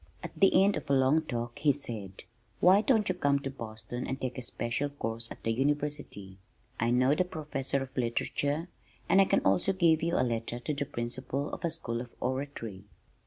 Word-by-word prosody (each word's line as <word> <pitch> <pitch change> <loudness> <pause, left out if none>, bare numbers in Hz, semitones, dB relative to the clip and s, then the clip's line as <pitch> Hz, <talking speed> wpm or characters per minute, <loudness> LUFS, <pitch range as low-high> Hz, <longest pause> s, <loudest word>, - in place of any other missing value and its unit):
At - - -5
the 195 -1 +5
end 200 +1 +3
of - - -7
a - - +4
long 135 +4 +4
talk 120 -5 -4
he 145 - +4
said, 110 -9 -7 0.4
"Why 190 +3 +6
don't 220 -3 +3
you 185 - +2
come 145 -5 +2
to 135 - -4
Boston 115 0 -6
and 135 +1 -3
take 130 0 -3
a - - -4
special 120 +3 -2
course 115 -4 -4
at - - -10
the 115 - +1
University? 140 -7 -2 0.4
I 115 - +2
know 130 +3 +4
the 170 - +2
Professor 145 -5 -3
of 135 +1 -12
Literature, 140 +6 -1 0.4
and 195 - +6
I - - +6
can - - +2
also 95 - +2
give 170 -4 +4
you 170 +1 0
a - - +3
letter 115 0 -2
to 135 +5 -3
the 145 0 -2
principal 130 +4 -4
of - - -6
a 170 - +2
school 120 -8 -3
of 120 -1 -10
Oratory." 125 -7 -4
135 Hz, 205 wpm, -30 LUFS, 120-150 Hz, 0.4 s, Why